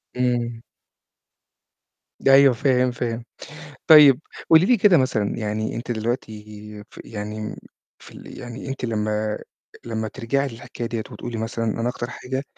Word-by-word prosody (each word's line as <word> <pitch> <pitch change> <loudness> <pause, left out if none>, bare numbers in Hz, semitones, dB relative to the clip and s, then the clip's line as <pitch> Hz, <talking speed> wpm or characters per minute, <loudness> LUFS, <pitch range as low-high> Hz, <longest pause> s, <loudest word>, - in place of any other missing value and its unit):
إمم. 120 -2 -1 1.7
أيوه 135 -1 +7
فاهم، 125 0 +2
فاهم. 120 -1 -4 0.6
طيب 150 -4 +8 0.3
قولي 165 +2 +7
لي 245 - +5
كده 195 -3 +5
مثلًا 125 -6 0
يعني 110 0 -2
أنتِ 120 +1 -6
دلوقتي 105 -2 -5
ف - - -12
يعني 105 0 -6 0.4
في - - -15
ال - - -11
يعني 120 +3 -8
أنتِ 135 -2 -5
لمّا 110 -1 -1 0.5
لمّا 110 -1 -3
ترجعي 135 +4 -1
للحكاية 120 0 -7
ديّة 115 -1 -3
وتقولي 120 -2 -6
مثلًا 115 +1 -3
أنا 115 +2 -1
أكتر 125 0 -4
حاجة 130 +2 -5
120 Hz, 135 wpm, -23 LUFS, 110-130 Hz, 1.7 s, طيب